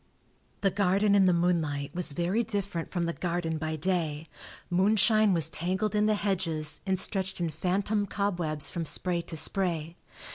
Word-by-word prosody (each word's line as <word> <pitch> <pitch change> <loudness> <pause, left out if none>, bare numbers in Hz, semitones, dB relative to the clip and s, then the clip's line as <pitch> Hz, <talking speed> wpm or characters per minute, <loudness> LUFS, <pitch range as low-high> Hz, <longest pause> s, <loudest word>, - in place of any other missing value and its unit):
The 195 -2 +2
garden 200 +1 +2
in 195 -2 +5
the - - +5
moonlight 160 -5 0
was 175 -4 0
very 175 +8 0
different 200 -6 -3
from 175 -2 -1
the 170 - -2
garden 170 -3 -2
by 155 0 -2
day; 160 -2 -2 0.4
moonshine 210 +3 +3
was 165 -4 +2
tangled 185 +6 -1
in 210 0 +2
the 215 - +3
hedges 175 -7 -1
and 190 -1 +1
stretched 190 -1 -3
in 170 -1 0
phantom 195 +6 -1
cobwebs 175 -8 -1
from 170 - -3
spray 175 +1 +2
to 165 -1 -5
spray. 170 -2 0
180 Hz, 160 wpm, -28 LUFS, 165-200 Hz, 0.4 s, in